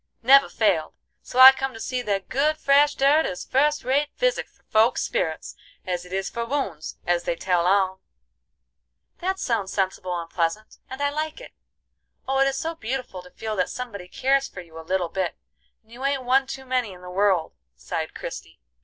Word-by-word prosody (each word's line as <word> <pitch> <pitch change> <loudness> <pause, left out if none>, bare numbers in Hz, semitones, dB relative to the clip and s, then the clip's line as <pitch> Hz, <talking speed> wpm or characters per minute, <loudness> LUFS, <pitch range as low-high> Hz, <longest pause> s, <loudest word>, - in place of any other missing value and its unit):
Never 275 +3 +7
failed; 190 -8 +1 0.3
so - - -8
I 260 +1 +12
come 270 -2 -4
to - - -9
see 255 +2 -2
that 200 -4 -2
good 300 +4 +1
fresh 285 0 +4
dirt 285 +4 +4
is 180 - -5
fust 295 +3 +1
rate 280 +4 +1
physic - - 0
for - - -33
folk's 220 +3 +2
spirits 160 -1 -2 0.3
as 180 -1 -3
it 180 - -14
is 190 0 -2
for 235 - -4
wounds, 230 - -3
as 175 0 0
they - - 0
tell 180 0 +1
on." 190 -1 +2 1.2
"That 380 +2 -1
sounds 215 -6 -1
sensible 185 -2 -2
and 165 - -6
pleasant, 170 +5 -2
and 265 +2 -5
I 285 - +1
like 310 +4 -3
it. - - -11 0.8
Oh, 270 0 +1
it 270 - +4
is 270 0 -1
so 325 +4 -2
beautiful 245 - -5
to 180 - -15
feel 220 +3 -5
that 180 - +1
somebody 215 -8 -6
cares 270 +7 +1
for 180 - -9
you 165 -2 -12
a - - -6
little 175 +1 -1
bit, 185 0 -2 0.5
and 220 - -27
you 245 +3 -9
ain't 275 -1 0
one 265 +2 +3
too 265 0 -7
many 250 -5 -1
in 180 - -14
the 180 - -8
world," 185 -3 +1 0.2
sighed - - -5
Christie. - - -8
230 Hz, 200 wpm, -24 LUFS, 185-270 Hz, 1.2 s, I